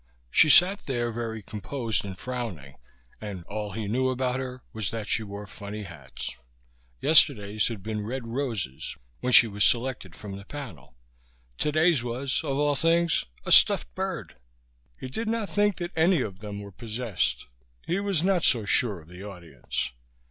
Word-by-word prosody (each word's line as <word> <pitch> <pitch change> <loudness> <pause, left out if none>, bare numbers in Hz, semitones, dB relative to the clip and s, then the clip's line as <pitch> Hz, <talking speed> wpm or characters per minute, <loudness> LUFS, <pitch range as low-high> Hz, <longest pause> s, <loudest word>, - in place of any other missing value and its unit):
She 155 - +6
sat 185 +6 +6
there 120 -3 -1
very 110 -2 -4
composed 110 +3 -3
and 95 -2 -7
frowning, 105 - -5 0.5
and 100 -5 -6
all 105 +1 -5
he 110 0 -4
knew 130 +5 +1
about 130 0 -1
her 130 -1 -6
was 110 -3 -2
that 115 -2 -4
she - - +1
wore 100 -1 -7
funny 105 +1 -7
hats. 75 -8 -8 0.7
Yesterday's 110 -9 +5
had 110 -5 -6
been 105 0 -3
red 125 +3 -4
roses 115 - -3 0.2
when 125 - -1
she 120 - +9
was 105 -1 0
selected 120 -8 +1
from 100 -2 -8
the 100 - -11
panel; 95 - -9 0.6
today's 155 -1 +3
was, 125 +3 -2
of 135 - -2
all 145 0 +2
things, 165 +3 +2 0.2
a - - -3
stuffed - - +6
bird. - - -4 0.6
He - - -6
did 220 - -4
not 225 -3 -2
think 205 -1 +2
that 175 0 -4
any 165 -1 +3
of 95 -3 -7
them 105 -1 -6
were 100 0 -9
possessed. 115 0 -2 0.4
He 180 - 0
was 200 -5 0
not 185 -3 +2
so 115 -4 +4
sure 100 -3 +2
of 80 - -19
the 90 +2 -11
audience. 85 -11 -5
115 Hz, 170 wpm, -27 LUFS, 100-140 Hz, 0.7 s, she